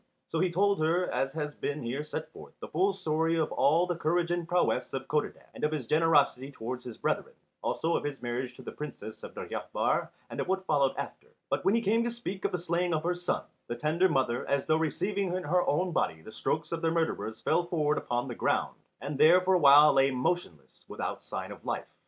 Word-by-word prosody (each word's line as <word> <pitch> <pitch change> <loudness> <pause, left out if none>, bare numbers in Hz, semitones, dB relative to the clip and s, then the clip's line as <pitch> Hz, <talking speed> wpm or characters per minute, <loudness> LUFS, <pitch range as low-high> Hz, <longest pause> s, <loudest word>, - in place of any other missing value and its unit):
So 165 - -1
he 180 0 +2
told 200 +2 +2
her, 170 +3 +1
as 135 0 -1
has 150 -2 -3
been 145 -1 -3
here 130 +5 -2
set 150 - -6
forth, - - -13
the - - -7
full 390 +2 +2
story 160 - 0
of 160 - 0
all 155 +6 +3
the 175 -1 -2
courage 170 +1 0
and 175 -1 -1
prowess 175 +1 +1
of 135 0 -4
Codadad, 150 -1 -2
and - - -9
of 150 - +2
his 150 -5 -3
generosity 145 -2 +3
towards 125 -1 -5
his 120 -3 -8
brethren, - - -2 0.3
also 165 +1 0
of - - -1
his 145 -2 -4
marriage 125 +1 -3
to - - -12
the - - -6
Princess 135 -7 -8
of - - -9
Deryabar - - -1 0.2
and - - -6
of - - -1
what 190 0 -1
followed 140 -5 +2
after. - - -6 0.2
But - - 0
when 195 - +4
he 230 - +1
came 225 +3 +3
to 240 - 0
speak 230 -5 -5
of - - +1
the 180 - 0
slaying 175 0 0
of 155 - -2
her 175 +1 +1
son, 175 0 -2 0.2
the 120 - -3
tender 160 +8 +2
mother, 130 -6 +1
as 140 -1 +1
though 155 - +3
receiving 185 +4 -1
in 185 - -2
her 180 +4 +2
own 180 +5 +1
body 80 - -1
the 110 - -10
strokes 155 +7 -2
of 165 -1 -2
the 165 - +2
murderers 160 -9 -1
fell 170 +2 +1
forward 150 -4 +1
upon 120 +1 -2
the 125 - -4
ground, - - 0 0.2
and 140 -1 -4
there 165 +5 +7
for 190 +1 +2
a 180 - +4
while 145 0 +8
lay 135 0 +4
motionless 130 - -3
without - - -4
sign - - -6
of - - -10
life. - - -2
155 Hz, 230 wpm, -30 LUFS, 135-175 Hz, 0.3 s, while